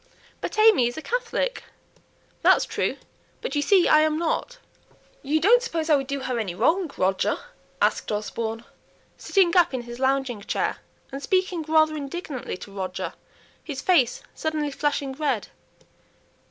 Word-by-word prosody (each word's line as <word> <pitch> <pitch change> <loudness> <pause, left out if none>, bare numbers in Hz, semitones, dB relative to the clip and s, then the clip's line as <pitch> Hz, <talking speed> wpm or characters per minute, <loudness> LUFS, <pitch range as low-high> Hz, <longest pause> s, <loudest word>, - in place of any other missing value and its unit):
"But - - -4
AimÄe 430 - +5
is 240 - -5
a - - -4
Catholic?" - - -2 0.8
"That's - - +5
true! - - -2 0.4
but - - -5
you 290 - +2
see 370 +4 +4
I 305 - +6
am 310 0 +2
not. 340 +9 -2 0.6
You 295 +3 +1
don't 460 +9 +5
suppose 330 -9 -2
I - - +7
would 270 -2 -1
do 280 0 -3
her 250 -2 -2
any 190 -6 -3
wrong, 325 - +2
Roger?" 190 +1 +1 0.5
asked - - +1
Osborne, 225 +2 -3 0.5
sitting 375 -3 +2
up 350 -7 +4
in 245 - -3
his 240 +1 -9
lounging 265 -4 0
chair, - - -1 0.3
and 275 +1 -6
speaking 370 0 0
rather 310 0 +4
indignantly 285 - -5
to 200 - -9
Roger, 185 -2 -4 0.5
his 280 -3 -6
face 275 -10 +3
suddenly 305 -2 -2
flushing 285 -1 -1
red. 270 -6 -1
290 Hz, 155 wpm, -25 LUFS, 250-345 Hz, 0.8 s, I